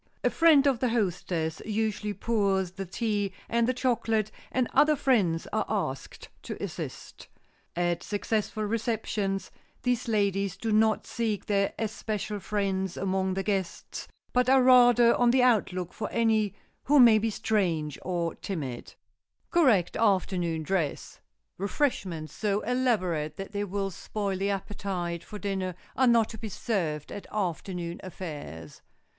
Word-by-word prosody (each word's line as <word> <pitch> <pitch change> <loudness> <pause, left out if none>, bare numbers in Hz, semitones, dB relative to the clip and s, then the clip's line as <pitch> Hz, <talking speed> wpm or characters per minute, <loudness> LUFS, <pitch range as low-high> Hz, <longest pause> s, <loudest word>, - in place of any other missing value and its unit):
A - - +3
friend 315 -4 +5
of 270 -4 +3
the 250 - +1
hostess 180 -7 -1
usually 210 -1 -2
pours 195 -4 +1
the 195 0 -6
tea 205 0 -1
and 235 0 +2
the 255 - +2
chocolate, 225 -4 0 0.2
and 255 -2 +1
other 300 0 +5
friends 210 - +2
are 215 -1 +2
asked 185 -11 -3
to - - -6
assist. - - -7 0.5
At 175 0 0
successful 215 +1 -2
receptions 210 -3 -2 0.3
these 250 -1 0
ladies 200 -3 0
do 225 +3 -2
not 220 0 +3
seek 220 -4 -2
their 200 -1 +1
especial 215 -1 -3
friends 190 -2 -1
among 190 -1 0
the 195 - -1
guests, 195 -4 -3 0.3
but 250 0 +3
are 265 -1 +6
rather 245 -2 +7
on 245 -1 +3
the 255 +1 +4 0.3
lookout 180 -1 -5
for 215 - -4
any 220 -3 +2 0.3
who 290 +1 +5
may 230 -3 +8
be 225 +1 0
strange 175 -10 -1
or 170 -2 -2
timid. 140 -11 -5
[Sidenote: - - -14 0.6
CORRECT 250 - +3
AFTERNOON 185 -6 +1
DRESS] 165 -3 -2 0.4
Refreshments 190 - -1
so 205 -1 0
elaborate 185 - 0
that 195 0 -6
they 205 0 -2
will 195 0 -2
spoil 200 +2 -3
the 195 +2 -1
appetite 190 -3 -3
for 210 - -8
dinner 190 -3 -3 0.2
are 260 - +3
not 230 -2 +4
to 220 - -8
be 220 - -5
served 165 -9 -2
at 205 - -7
afternoon 180 -3 -3
affairs. 145 - -8
200 Hz, 145 wpm, -28 LUFS, 185-225 Hz, 0.6 s, may